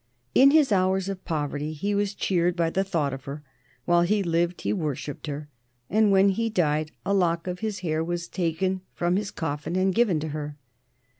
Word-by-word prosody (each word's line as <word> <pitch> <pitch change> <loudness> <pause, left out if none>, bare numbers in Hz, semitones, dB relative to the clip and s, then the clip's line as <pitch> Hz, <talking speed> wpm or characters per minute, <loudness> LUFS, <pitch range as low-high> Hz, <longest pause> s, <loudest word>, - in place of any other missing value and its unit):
In 270 +2 +7
his 295 -4 +4
hours 190 0 +2
of 190 -2 -5
poverty 150 -1 -2
he 200 +7 -2
was 200 0 0
cheered 175 -3 +1
by 165 -2 +1
the 195 - +1
thought 160 -8 -1
of 135 -1 -8
her; 145 +2 -6 0.4
while 175 0 +4
he 200 +4 +2
lived 170 0 0
he - - 0
worshipped 150 -5 -4
her, 145 0 -5 0.4
and 215 +1 +4
when 195 0 +5
he 225 +4 0
died 155 -6 +1 0.2
a 200 - +1
lock 170 -3 +1
of 180 -1 -4
his 215 -3 -3
hair 160 -2 0
was 170 0 -3
taken 185 +2 -1
from 175 +1 +1
his 200 0 -1
coffin 150 +1 -4
and 190 0 +2
given 215 -8 +3
to 155 +1 -4
her. 150 -1 -5
175 Hz, 200 wpm, -26 LUFS, 155-195 Hz, 0.4 s, In